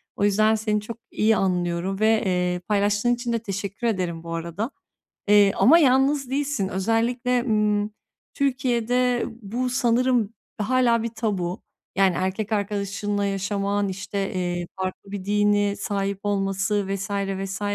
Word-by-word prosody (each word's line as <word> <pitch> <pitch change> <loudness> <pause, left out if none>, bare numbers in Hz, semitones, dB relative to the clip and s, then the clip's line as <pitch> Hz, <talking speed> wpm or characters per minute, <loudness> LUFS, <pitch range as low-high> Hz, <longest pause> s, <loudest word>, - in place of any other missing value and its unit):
O - - -2
yüzden 215 +2 +4
seni 215 -1 0
çok 230 +2 -7
iyi 220 +1 +3
anlıyorum 180 +1 -1
ve, 220 0 +3
eee, 180 -1 0
paylaştığın 205 +3 +2
için 240 -1 -3
de 230 - +1
teşekkür 200 +2 -4
ederim 175 -6 -2
bu 165 0 -6
arada, 170 - -3 0.6
eee, 205 -1 +6
ama 325 +7 +7
yalnız 270 -1 +3
değilsin. 275 -8 -1
Özellikle, 235 +5 +1
ımm, 210 -2 +1 0.4
Türkiye'de 250 -2 +1 0.2
bu 245 +5 -2
sanırım 245 -2 +2 0.2
hâlâ 235 +1 +2
bir 230 - -1
tabu. 205 -6 -3 0.3
Yani, 190 -2 +4
erkek 195 +4 -2
arkadaşınla 205 0 -1
yaşaman, 200 +1 -1
işte, 195 +1 -3
iii, 175 -1 -2
farklı 185 +1 -4
bir 195 -2 -5
dini 205 0 +2
sahip 200 -1 -2
olması 195 0 0
vs. 195 +2 -5
vs. 195 -1 -3
205 Hz, 135 wpm, -24 LUFS, 195-230 Hz, 0.6 s, ama